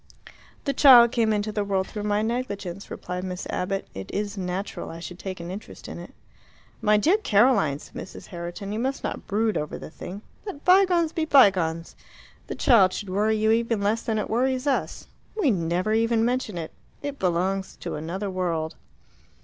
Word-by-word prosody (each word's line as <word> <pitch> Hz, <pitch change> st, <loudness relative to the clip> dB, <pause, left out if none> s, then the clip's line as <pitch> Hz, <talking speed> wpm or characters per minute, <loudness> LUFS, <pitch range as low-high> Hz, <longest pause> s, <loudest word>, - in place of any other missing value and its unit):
"The 280 Hz, -, 0 dB
child 245 Hz, -5 st, +8 dB
came 230 Hz, -3 st, +2 dB
into 210 Hz, 0 st, 0 dB
the 210 Hz, -1 st, -1 dB
world 195 Hz, -2 st, 0 dB
through 210 Hz, +1 st, -6 dB
my 210 Hz, 0 st, +1 dB
negligence," 205 Hz, -6 st, -4 dB
replied 180 Hz, 0 st, -5 dB
Miss 180 Hz, -1 st, -5 dB
Abbott. 195 Hz, +2 st, -2 dB
"It 95 Hz, 0 st, -7 dB
is 205 Hz, 0 st, -3 dB
natural 190 Hz, +1 st, -4 dB
I 165 Hz, -, -8 dB
should 175 Hz, +2 st, -8 dB
take 190 Hz, -2 st, -6 dB
an 170 Hz, +1 st, -6 dB
interest 205 Hz, +4 st, -9 dB
in -, -, -7 dB
it." -, -, -10 dB, 0.7 s
"My 210 Hz, -1 st, +4 dB
dear 335 Hz, -, +4 dB
Caroline," 210 Hz, -, +3 dB
said -, -, -15 dB
Mrs. -, -, -8 dB
Herriton, 175 Hz, +3 st, -6 dB
"you 215 Hz, -, -2 dB
must 265 Hz, +3 st, -2 dB
not -, -, -4 dB
brood 215 Hz, +1 st, +1 dB
over 150 Hz, -, -3 dB
the -, -, -9 dB
thing. 195 Hz, +5 st, -8 dB, 0.2 s
Let 380 Hz, -9 st, -8 dB
bygones 360 Hz, -3 st, +5 dB
be 320 Hz, -, 0 dB
bygones. 185 Hz, -, +3 dB, 0.5 s
The -, -, -4 dB
child 200 Hz, -8 st, +5 dB
should 200 Hz, -3 st, -5 dB
worry 215 Hz, +3 st, +2 dB
you 220 Hz, +1 st, +2 dB
even 230 Hz, -1 st, +1 dB
less 210 Hz, +3 st, +1 dB
than 225 Hz, -3 st, -1 dB
it 210 Hz, -, -1 dB
worries 255 Hz, +3 st, 0 dB
us. 280 Hz, -2 st, -1 dB, 0.3 s
We 295 Hz, -11 st, +4 dB
never 180 Hz, +2 st, 0 dB
even 225 Hz, 0 st, +2 dB
mention 245 Hz, -6 st, -1 dB
it. 165 Hz, -2 st, -5 dB, 0.3 s
It 285 Hz, -1 st, -4 dB
belongs 190 Hz, +2 st, 0 dB
to -, -, -4 dB
another 180 Hz, +6 st, -4 dB
world." 170 Hz, -4 st, -2 dB
205 Hz, 185 wpm, -25 LUFS, 185-235 Hz, 0.7 s, child